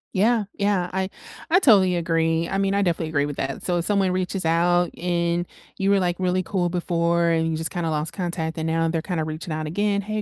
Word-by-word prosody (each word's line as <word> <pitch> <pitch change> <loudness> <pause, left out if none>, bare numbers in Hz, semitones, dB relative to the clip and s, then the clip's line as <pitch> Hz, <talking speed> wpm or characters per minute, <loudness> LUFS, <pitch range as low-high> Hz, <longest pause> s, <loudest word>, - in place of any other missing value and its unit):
Yeah. 220 +3 +3 0.2
Yeah. 200 -3 +1
I 190 0 -1 0.4
I 345 - +5
totally 200 - +5
agree, 165 -1 +1
I 195 +2 -1
mean, 195 0 +1
I 200 - +2
definitely 165 -3 -1
agree 145 -2 +1
with 145 -1 -5
that. 135 0 -3
So, 175 -1 0
if 170 - -2
someone 195 -2 +2
reaches 185 0 -2
out 175 +2 +2
and 175 0 0 0.3
you 195 0 0
were, 200 -1 +4
like, 175 -1 0
really 185 0 +1
cool 175 0 -1
before 170 -1 +1
and 165 0 +1
you 160 - -1
just 160 +1 -3
kinda 170 -2 -2
lost 155 +2 -2
contact, 170 -2 -3
and 160 - -2
now 165 0 +1
they're 165 0 -1
kinda 170 -2 -2
reaching 155 +3 -5
out 155 0 -3
again, 200 +5 0
"Hey, 215 +1 -3
175 Hz, 230 wpm, -23 LUFS, 165-190 Hz, 0.4 s, I